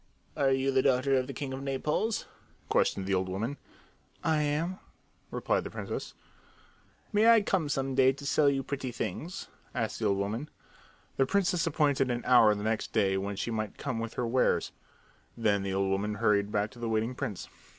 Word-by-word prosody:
"Are 140 Hz, -1 st, +2 dB
you 135 Hz, 0 st, +2 dB
the 130 Hz, 0 st, +3 dB
daughter 130 Hz, +1 st, +2 dB
of 130 Hz, -1 st, +1 dB
the -, -, -4 dB
king 135 Hz, 0 st, -5 dB
of 135 Hz, -, -5 dB
Naples?" 150 Hz, +11 st, -1 dB, 0.4 s
questioned 95 Hz, -, +2 dB
the 100 Hz, -, -1 dB
old 95 Hz, 0 st, 0 dB
woman. 115 Hz, +10 st, -3 dB, 0.7 s
"I 160 Hz, -2 st, +2 dB
am," 155 Hz, +6 st, -1 dB, 0.5 s
replied -, -, 0 dB
the -, -, -6 dB
princess. -, -, -5 dB, 1.0 s
"May 215 Hz, +2 st, +5 dB
I 230 Hz, -2 st, +7 dB
come 180 Hz, -7 st, 0 dB
some 135 Hz, -1 st, -1 dB
day 130 Hz, 0 st, +5 dB
to 140 Hz, +1 st, -9 dB
sell 145 Hz, 0 st, +4 dB
you 135 Hz, -1 st, 0 dB
pretty 135 Hz, -2 st, -4 dB
things?" 140 Hz, -, -5 dB, 0.3 s
asked 115 Hz, -3 st, -2 dB
the 110 Hz, -, -1 dB
old 100 Hz, -1 st, +2 dB
woman. 110 Hz, +9 st, -3 dB, 0.7 s
The 135 Hz, -, +3 dB
princess 185 Hz, -2 st, +1 dB
appointed 145 Hz, -4 st, +2 dB
an 120 Hz, -1 st, -2 dB
hour 115 Hz, -4 st, +6 dB
the 105 Hz, -, -5 dB
next 110 Hz, 0 st, -1 dB
day 100 Hz, -4 st, +2 dB
when 100 Hz, +1 st, -2 dB
she 115 Hz, -, -3 dB
might 110 Hz, -2 st, -3 dB
come 130 Hz, -5 st, -3 dB
with 115 Hz, 0 st, -5 dB
her 125 Hz, -, -1 dB
wares. 125 Hz, +2 st, +1 dB, 0.7 s
Then 105 Hz, -3 st, +2 dB
the 95 Hz, -1 st, -2 dB
old 95 Hz, 0 st, +1 dB
woman 105 Hz, +2 st, -1 dB
hurried 105 Hz, -2 st, +2 dB
back 105 Hz, +1 st, 0 dB
to 120 Hz, -, -14 dB
the 115 Hz, -1 st, -2 dB
waiting 110 Hz, +2 st, 0 dB
prince. 105 Hz, -5 st, -5 dB
125 Hz, 190 wpm, -30 LUFS, 105-140 Hz, 1.0 s, I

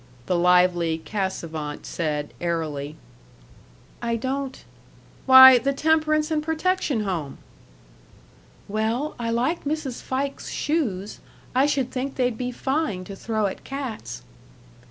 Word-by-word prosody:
the 180 Hz, -, 0 dB
lively 175 Hz, -2 st, +3 dB
Cassavant 160 Hz, -4 st, -4 dB
said, 150 Hz, -3 st, -3 dB
airily. 155 Hz, -4 st, -3 dB, 1.1 s
"I 235 Hz, -1 st, -1 dB
don't 265 Hz, +3 st, -4 dB, 0.3 s
" -, -, -27 dB
"Why! 260 Hz, -1 st, +10 dB
The 275 Hz, +4 st, 0 dB
Temperance 310 Hz, +1 st, +2 dB
and 310 Hz, -1 st, +1 dB
Protection 320 Hz, -, 0 dB
Home." 170 Hz, -9 st, -3 dB, 1.3 s
"Well, 225 Hz, +8 st, -1 dB
I 230 Hz, -1 st, -2 dB
like 250 Hz, +9 st, 0 dB
Mrs. 290 Hz, -4 st, -3 dB
Fike's 275 Hz, +1 st, -3 dB
shoes. 215 Hz, -, -2 dB, 0.3 s
I 265 Hz, +3 st, +4 dB
should 270 Hz, -3 st, 0 dB
think 265 Hz, +1 st, -3 dB
they'd 250 Hz, -2 st, 0 dB
be 250 Hz, +2 st, -3 dB
fine 265 Hz, -, -2 dB
to 195 Hz, +2 st, -8 dB
throw 215 Hz, +1 st, -1 dB
at 195 Hz, -, -4 dB
cats." 260 Hz, -, -6 dB
235 Hz, 120 wpm, -24 LUFS, 180-275 Hz, 1.3 s, Why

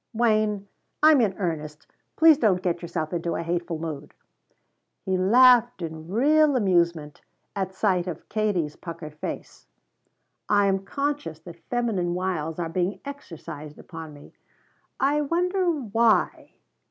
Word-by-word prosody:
"Wayne 215 Hz, -3 st, +1 dB, 0.4 s
I'm 310 Hz, -4 st, +7 dB
in 200 Hz, -4 st, 0 dB
earnest. 155 Hz, -5 st, -4 dB, 0.3 s
Please 320 Hz, -2 st, +6 dB
don't 195 Hz, -7 st, +2 dB
get 175 Hz, -1 st, -1 dB
yourself 165 Hz, -2 st, -4 dB
into 170 Hz, 0 st, -2 dB
a -, -, -3 dB
hateful 170 Hz, 0 st, -2 dB
mood!" 155 Hz, -3 st, -7 dB, 0.9 s
He 190 Hz, -, 0 dB
laughed 240 Hz, +2 st, +5 dB
in 160 Hz, -1 st, -7 dB
real 290 Hz, -, +3 dB
amusement 170 Hz, -, +1 dB, 0.3 s
at 190 Hz, -1 st, -3 dB
sight 185 Hz, -3 st, +1 dB
of 175 Hz, -, -6 dB
Katie's 200 Hz, -8 st, -1 dB
puckered 165 Hz, -3 st, -8 dB
face. 150 Hz, -, -7 dB, 0.8 s
"I 205 Hz, -1 st, +4 dB
am 195 Hz, -1 st, +2 dB
conscious 285 Hz, -, -3 dB
that 170 Hz, 0 st, -13 dB
feminine 210 Hz, -8 st, -1 dB
wiles 175 Hz, -4 st, -2 dB
are 170 Hz, -2 st, -2 dB
being 180 Hz, +4 st, -2 dB
exercised 155 Hz, -, -9 dB
upon 160 Hz, -2 st, -9 dB
me. 145 Hz, -, -15 dB, 0.7 s
I 290 Hz, +3 st, +2 dB
wonder 360 Hz, +4 st, 0 dB
why?" 235 Hz, -7 st, +1 dB
190 Hz, 130 wpm, -25 LUFS, 165-240 Hz, 0.9 s, I'm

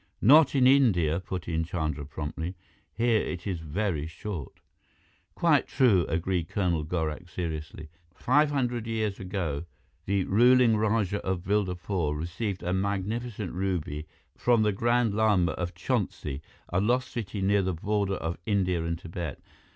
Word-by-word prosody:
"Not 145 Hz, +4 st, +7 dB
in 130 Hz, -2 st, +4 dB
India," 100 Hz, -, +4 dB
put 90 Hz, -1 st, -6 dB
in 80 Hz, -1 st, 0 dB
Chandra 80 Hz, -4 st, -3 dB
promptly. 80 Hz, +4 st, -5 dB, 0.4 s
"Here 115 Hz, -1 st, +2 dB
it 90 Hz, -1 st, -5 dB
is 95 Hz, -5 st, -2 dB
very 80 Hz, 0 st, -2 dB
short." 85 Hz, -, -7 dB, 0.8 s
"Quite -, -, +3 dB
true," 105 Hz, -, +3 dB
agreed 85 Hz, +1 st, -1 dB
Colonel 85 Hz, -6 st, 0 dB
Gorak 80 Hz, +1 st, -3 dB
seriously. 80 Hz, -3 st, -5 dB, 0.3 s
"Five 145 Hz, +7 st, +3 dB
hundred 125 Hz, -5 st, -1 dB
years 110 Hz, -3 st, -2 dB
ago, 85 Hz, -5 st, -3 dB, 0.4 s
the 100 Hz, -1 st, +1 dB
ruling 120 Hz, +3 st, +5 dB
Rajah 105 Hz, -2 st, 0 dB
of 95 Hz, -2 st, -2 dB
Bildapore 90 Hz, -5 st, -1 dB
received 90 Hz, +5 st, -4 dB
a 90 Hz, +1 st, -1 dB
magnificent 100 Hz, +2 st, -2 dB
ruby 85 Hz, -5 st, -2 dB, 0.3 s
from 120 Hz, -3 st, +3 dB
the 105 Hz, -, +3 dB
Grand 120 Hz, +2 st, +1 dB
Lama 105 Hz, -6 st, +3 dB
of 85 Hz, +2 st, -4 dB
Chonsi, 70 Hz, -1 st, -2 dB, 0.3 s
a 90 Hz, +2 st, +1 dB
lost 125 Hz, +5 st, +1 dB
city 105 Hz, -4 st, -4 dB
near 100 Hz, +1 st, +3 dB
the 95 Hz, -2 st, -1 dB
border 100 Hz, +2 st, 0 dB
of 80 Hz, -1 st, -4 dB
India 90 Hz, -5 st, +1 dB
and 85 Hz, 0 st, -2 dB
Tibet. 85 Hz, -1 st, -6 dB
95 Hz, 145 wpm, -28 LUFS, 85-110 Hz, 0.8 s, Not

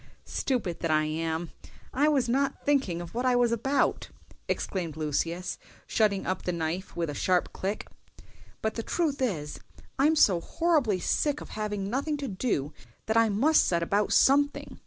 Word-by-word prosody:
"Stupid 235 Hz, -11 st, -2 dB
that 165 Hz, -, -2 dB
I 155 Hz, 0 st, +3 dB
am! 160 Hz, +2 st, -2 dB, 0.4 s
I 285 Hz, +4 st, +3 dB
was 275 Hz, -5 st, +2 dB
not 270 Hz, +3 st, 0 dB
thinking 265 Hz, -13 st, +1 dB
of 170 Hz, -, -9 dB
what 240 Hz, +2 st, -2 dB
I 255 Hz, -1 st, +3 dB
was 245 Hz, -1 st, +3 dB
about!" 270 Hz, +5 st, 0 dB, 0.4 s
exclaimed 170 Hz, -5 st, -3 dB
Lucius, 165 Hz, +4 st, -2 dB, 0.3 s
shutting 205 Hz, -3 st, +1 dB
up 185 Hz, -, -1 dB
the 180 Hz, -, -2 dB
knife 170 Hz, +2 st, -3 dB
with 170 Hz, -1 st, -1 dB
a 145 Hz, -, -4 dB
sharp 180 Hz, +4 st, +1 dB
click; 195 Hz, +3 st, -3 dB, 0.8 s
"but 220 Hz, 0 st, 0 dB
the 230 Hz, -, -3 dB
truth 295 Hz, +2 st, -1 dB
is 160 Hz, -, -2 dB, 0.4 s
I'm 300 Hz, +4 st, +4 dB
so 190 Hz, -, +5 dB
horribly 295 Hz, -, +1 dB
sick 295 Hz, -, 0 dB
of -, -, -10 dB
having 210 Hz, -2 st, -3 dB
nothing 280 Hz, +7 st, -1 dB
to 280 Hz, -1 st, -4 dB
do 185 Hz, -, -2 dB, 0.3 s
that 220 Hz, -, -1 dB
I 230 Hz, -1 st, +5 dB
must 270 Hz, +10 st, +4 dB
set 170 Hz, -1 st, +1 dB
about 200 Hz, +4 st, +1 dB
something. 285 Hz, +2 st, +3 dB
210 Hz, 170 wpm, -28 LUFS, 170-270 Hz, 0.8 s, so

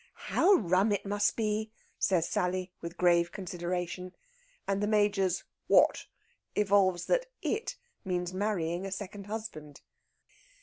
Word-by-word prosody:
"How 395 Hz, -, +5 dB
rum 195 Hz, -, +2 dB
it 205 Hz, -, -1 dB
must 205 Hz, +1 st, +1 dB
be!" 215 Hz, -1 st, -1 dB, 0.3 s
says 175 Hz, -4 st, +2 dB
Sally, 185 Hz, 0 st, -1 dB
with 170 Hz, +1 st, -7 dB
grave 175 Hz, -1 st, +3 dB
consideration. 180 Hz, -1 st, -4 dB, 0.5 s
And 195 Hz, 0 st, 0 dB
the 205 Hz, -, +1 dB
Major's 205 Hz, -4 st, +2 dB, 0.2 s
"What?" -, -, +4 dB, 0.5 s
evolves 195 Hz, -3 st, +3 dB
that -, -, +1 dB, 0.2 s
"it" 445 Hz, +2 st, -1 dB, 0.3 s
means 180 Hz, -2 st, -2 dB
marrying 185 Hz, -3 st, -1 dB
a -, -, -7 dB
second 200 Hz, +1 st, -6 dB
husband. 205 Hz, -10 st, -7 dB
190 Hz, 125 wpm, -30 LUFS, 180-210 Hz, 0.5 s, How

